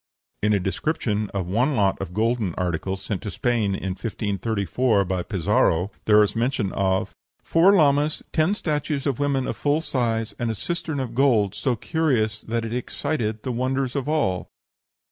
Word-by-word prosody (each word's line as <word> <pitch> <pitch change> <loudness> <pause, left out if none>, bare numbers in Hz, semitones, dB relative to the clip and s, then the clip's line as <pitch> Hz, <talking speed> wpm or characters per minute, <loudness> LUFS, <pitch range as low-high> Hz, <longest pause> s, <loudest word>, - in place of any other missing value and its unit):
In 105 - +2
a 100 - +3
description 105 - -1
of 95 -3 -3
one 120 - +1
lot 100 -5 +1
of 95 - -5
golden 110 -2 0
articles, 90 +2 -2
sent 100 -3 -3
to 105 - -4
Spain 110 -4 0
in 95 - -4
1534 105 +2 0
by 90 0 -1
Pizarro, 90 0 +1
there 105 0 +6
is 105 - -1
mention 115 -4 0
of 95 -1 0 0.3
"four 180 +5 +5
llamas, 150 -2 +3
ten 160 +6 +2
statues 150 -5 -2
of 140 -5 -1
women 140 -2 +1
of - - -3
full 145 +1 +1
size, 115 -7 -1
and 120 -1 -1
a 110 - -1
cistern 155 - -3
of 125 -3 -3
gold, 115 -7 +3
so 130 +1 0
curious 115 -6 0
that 115 0 -2
it 115 - -4
excited 120 -3 -2
the 130 - -2
wonder 130 +3 0
of 130 +2 -3
all." 95 - 0
115 Hz, 170 wpm, -24 LUFS, 100-140 Hz, 0.3 s, there